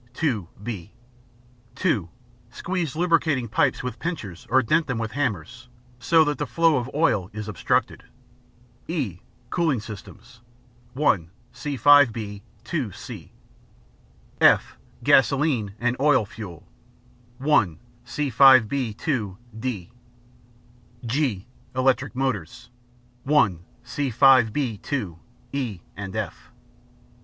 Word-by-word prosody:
(2) 120 - -1 0.2
(b). 105 -4 -6 0.8
(2) 135 - 0 0.4
Squeeze 170 +3 -3
lubricating 160 -7 +1
pipes 130 +4 +1
with 125 -2 -5
pincers 110 - -5
or 130 +3 +4
dent 155 +7 +2
them 130 -4 -2
with 110 -1 -3
hammers, 120 - -3 0.3
so 160 +6 +4
that 150 -1 -2
the 145 - -2
flow 165 +5 +3
of 125 0 -3
oil 105 - +2
is 105 0 -6
obstructed. 105 -6 -1 0.8
(e) 130 - -3 0.3
Cooling 160 -8 +1
Systems 115 +2 -11 0.5
(1) 105 - +1 0.2
See 135 +3 -5
5 145 -2 +7
b 105 -3 -6 0.2
(2) 125 - -2
(c). - - -10 1.1
(f) - - +5 0.3
Gasoline 135 -7 +3
and 125 +1 0
Oil 140 -5 +4
Fuel 95 -6 -10 0.7
(1) 120 - +2 0.3
See 140 +3 -3
5 130 -1 +7
b 120 -3 -2
(2) 110 - -2 0.2
(d). 110 -5 -4 1.1
(g) 120 -6 -1 0.3
Electric 130 0 +1
Motors 125 -2 -3 0.5
(1) 110 - +3 0.2
See 130 +3 -2
5 130 -1 +5
b 125 -4 -2
(2) 100 - -4 0.3
(e) 120 -10 -3
and 95 0 -7
(f). 110 -1 -5
125 Hz, 115 wpm, -24 LUFS, 105-145 Hz, 1.1 s, 5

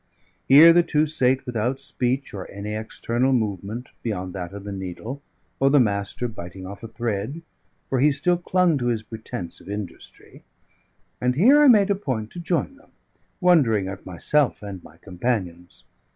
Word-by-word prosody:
Here 155 +5 +9
the 175 - +6
two 155 -2 +1
sate 130 -4 +1
without 125 +2 -2
speech 130 0 -2
or 95 -2 -7
any 100 +1 -6
external 115 +4 -1
movement, 110 +1 -2
beyond 95 -5 -4
that 90 -3 -5
of 100 0 -9
the 100 - -6
needle, 100 +8 -6 0.4
or 135 - +4
the 145 +1 +5
Master 100 +1 0
biting 95 -4 -9
off 100 +2 -9
a 115 - -7
thread, 115 +6 -4 0.4
for 130 - 0
he 150 +3 +5
still 175 +5 +1
clung 175 -3 +2
to 120 - -1
his 115 -3 -1
pretence 110 -6 -7
of - - -13
industry; 100 -3 -9 0.8
and 125 0 +1
here 260 - +6
I 295 - +7
made 210 -5 +6
a - - +3
point 125 - -4
to 175 - -8
join 175 +10 -1
them, 285 - -23 0.5
wondering 135 - +3
at 95 0 -7
myself 120 - 0
and 95 -3 -7
my - - -16
companions. 90 -3 -4
120 Hz, 170 wpm, -23 LUFS, 100-145 Hz, 0.8 s, Here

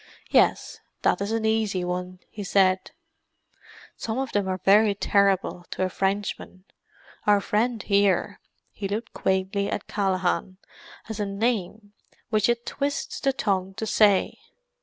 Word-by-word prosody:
"Yes, - - +2 0.2
that - - +2
is 200 +2 -2
an 225 -1 -1
easy 220 -4 +1
one," 180 0 -4
he 210 - -6
said. 190 -1 +2 1.1
"Some 225 +1 -4
of 265 -2 -2
them 205 -2 0
are 185 0 -1
very 200 +3 +4
terrible, 195 -3 +1
to - - -2
a 185 - 0
Frenchman; 195 -1 -3 0.6
our 205 -1 +5
friend 220 +2 0
here"—he 200 0 -1
looked 215 +4 -4
quaintly 190 +1 0
at 205 - -3
Callaghan—"has 195 - -3
a 205 - 0
name 205 0 -2 0.4
which 215 0 +2
it 235 0 0
twists 285 +2 -3
the 275 - +2
tongue 195 -6 -1
to 220 - -3
say. 205 -2 +3
200 Hz, 135 wpm, -25 LUFS, 190-220 Hz, 1.1 s, our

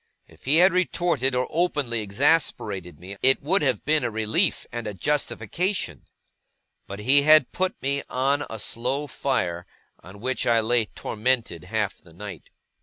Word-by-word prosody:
If - - -21
he 140 +3 +3
had 180 +3 +6
retorted 170 -7 +1
or 125 0 0
openly 145 -9 0
exasperated 100 - 0
me, 95 +3 -9
it 135 +1 +4
would 180 +6 +2
have 130 -7 0
been 150 -1 +2
a 120 - 0
relief 110 -1 0
and 120 -2 -5
a 105 - -5
justification; 150 - -2 0.8
but 100 - -7
he 130 +7 +4
had 155 -2 +5
put 185 0 -1
me 140 +1 0
on 140 +3 +1
a 110 - -6
slow 125 +7 -2
fire, 90 -11 -2 0.3
on 95 +3 -13
which 130 +4 -2
I 115 -1 +4
lay 115 0 +2
tormented 110 -6 -2
half 105 0 -2
the 85 - -19
night. 95 -2 -9
125 Hz, 160 wpm, -24 LUFS, 105-145 Hz, 0.8 s, had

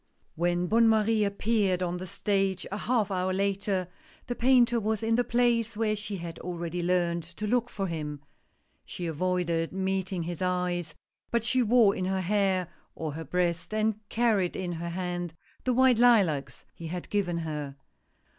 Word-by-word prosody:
HEN 175 +1 +1
Bonne 225 +4 +4
Marie 220 0 +3
appeared 200 -2 +1
on 175 0 -2
the 185 +1 -6
stage 195 0 0
a - - -2
half 225 -4 +1
T - - -2
f - - 0
hour 185 +1 0
later, 195 -1 0 0.4
the 245 - -2
Painter 240 -1 +4
was 220 0 -1
in 225 +1 +1
the 245 +2 +3
place 235 -2 +1
where 215 -1 +1
she 210 -1 -4
had 170 -1 -7
already 175 0 -4
learned 175 -1 +1
to 170 +6 -7
look 245 +2 +1
for 195 - -3
him. 150 -4 -4 0.6
She 175 - -6
avoided 170 0 0
meeting 190 -1 -1
his 170 +1 -5
eyes, 180 -3 -1 0.3
but 235 -1 +1
she 255 +2 +2
wore 230 -3 +5
in 185 - -2
her 190 0 0
hair, 190 -1 +1 0.3
or 160 -2 -4
her 160 +3 -6
breast, 175 +5 -1
and 215 0 +2 0.2
carried 220 -6 +1
in 180 -2 -3
her 170 0 -4
hand 175 -1 -4 0.3
the 255 - +2
white 260 -2 +5
lilacs 200 - +3
he 165 - -8
had 175 +2 -5
given 185 -5 0
her. 150 -4 -4
190 Hz, 175 wpm, -28 LUFS, 175-220 Hz, 0.6 s, wore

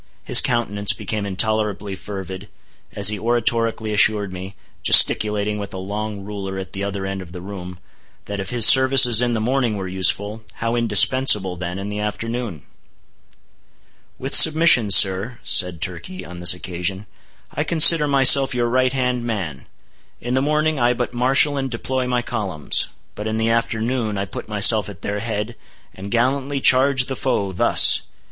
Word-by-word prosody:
His - - +7
countenance 105 -4 -1
became 105 -2 -6
intolerably 105 0 -1
fervid, 95 0 -10 0.4
as 100 0 +5
he 105 -1 -4
oratorically 115 -1 -2
assured 105 -2 +1
me—gesticulating 105 +3 +2
with 100 -1 -8
a - - -7
long 105 +2 -7
ruler 100 -1 -8
at 95 -1 -9
the 100 - -6
other 100 -1 -6
end 95 0 -6
of 85 -2 -14
the 90 - -9
room—that 90 +1 -12
if 95 - -6
his 120 -3 +5
services 130 -3 +5
in 120 -1 -1
the - - -3
morning 120 -1 -2
were 95 -1 -6
useful, 100 +3 -2
how 115 +1 -4
indispensable, 110 -3 +3
then, 90 +1 -7
in 100 +1 -7
the 105 0 -6
afternoon? 110 - -6 1.5
"With 135 +2 -7
submission, 160 -8 +4
sir," 100 +5 +3
said 90 -4 +1
Turkey 95 - -7
on 90 0 -12
this 90 +1 +5
occasion, 90 +2 -5 0.5
"I 150 - -3
consider 160 -1 +5
myself 135 -1 +4
your 120 -1 -2
right 130 +1 0
hand 125 -2 -3
man. 95 - -6 0.5
In 120 +1 -6
the 130 - 0
morning 150 +1 -1
I 120 0 +1
but 125 0 -5
marshal 135 +4 +1
and 135 -1 -4
deploy 130 +2 -5
my 125 -1 -2
columns; 100 -11 -2 0.3
but 105 - -8
in 110 0 -4
the 110 +1 -1
afternoon 115 -1 -3
I 100 - -4
put 100 - -10
myself 105 0 +4
at 100 - -14
their 105 0 -4
head, 110 +1 -6 0.4
and 95 +2 -10
gallantly 135 +4 -2
charge 130 0 +3
the 135 - -6
foe, 100 -7 -3
thus!" 90 - +4
110 Hz, 160 wpm, -19 LUFS, 95-125 Hz, 1.5 s, His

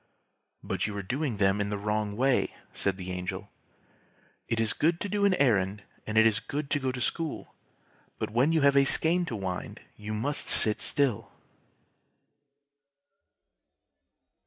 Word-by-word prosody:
"But - - -2
you 105 - -5
were 100 - -4
doing 130 +3 -2
them 100 +1 +2
in 100 - -1
the 105 - -2
wrong 105 0 -2
way!" 130 0 +1 0.2
said 95 -1 -1
the 90 -1 -6
Angel. 90 0 -5 1.0
"It 115 - -1
is 115 -1 +1
good 165 +2 +1
to - - -2
do 205 +1 +1
an 195 -2 +4
errand, 105 - +1 0.2
and 110 0 -2
it 110 - +7
is 110 -2 +3
good 145 0 -5
to 145 - +2
go 130 -1 -1
to 125 - -6
school, 160 +5 -3 0.6
but - - -3
when 125 +7 +3
you 160 -1 +2
have 140 0 +4
a 140 - +6
skein 170 +5 +3
to 120 - -4
wind 95 -3 -5 0.2
you 105 +1 -5
must 135 +7 -3
sit 105 -1 +3
still." 140 -7 0
115 Hz, 160 wpm, -28 LUFS, 105-145 Hz, 1.0 s, it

